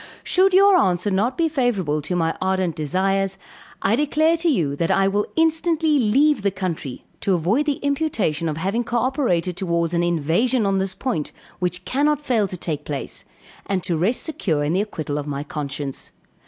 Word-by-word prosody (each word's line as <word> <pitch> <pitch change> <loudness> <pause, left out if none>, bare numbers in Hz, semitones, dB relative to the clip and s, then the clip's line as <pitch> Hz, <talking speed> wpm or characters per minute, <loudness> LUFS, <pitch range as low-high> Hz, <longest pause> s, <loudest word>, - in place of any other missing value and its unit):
Should 380 +1 +3
your 395 0 +6
answer 185 +2 +1
not 210 +7 0
be 335 -1 +2
favorable 220 - 0
to 180 +5 -3
my 165 -2 0
ardent 185 -3 0
desires, 195 +5 0 0.5
I 205 - +3
declare 310 +4 +2
to 335 +1 +1
you 160 - +1
that 165 - 0
I 195 0 +3
will 205 +1 0
instantly 320 -1 +2
leave 265 +4 +3
the 200 - +2
country, 170 -9 -5
to 195 -3 +1
avoid 205 - +1
the 290 - +2
imputation 250 - 0
of 150 - -3
having 195 +8 -1
cooperated 235 - 0
towards 170 -2 -1
an 170 - +2
invasion 175 - +1
on 195 -1 +1
this 190 -1 -2
point, 200 - -2 0.3
which 180 0 -2
cannot 295 +2 +1
fail 235 -8 +1
to 185 - -6
take 160 -4 -3
place, 140 -2 -5 0.4
and 190 -2 -1
to 180 -2 -1
rest 190 +10 +1
secure 170 - -1
in 150 +3 0
the 190 - +2
acquittal 155 -8 -4
of 145 - -6
my 140 -1 -3
conscience. 145 -3 -5
195 Hz, 180 wpm, -22 LUFS, 170-260 Hz, 0.5 s, your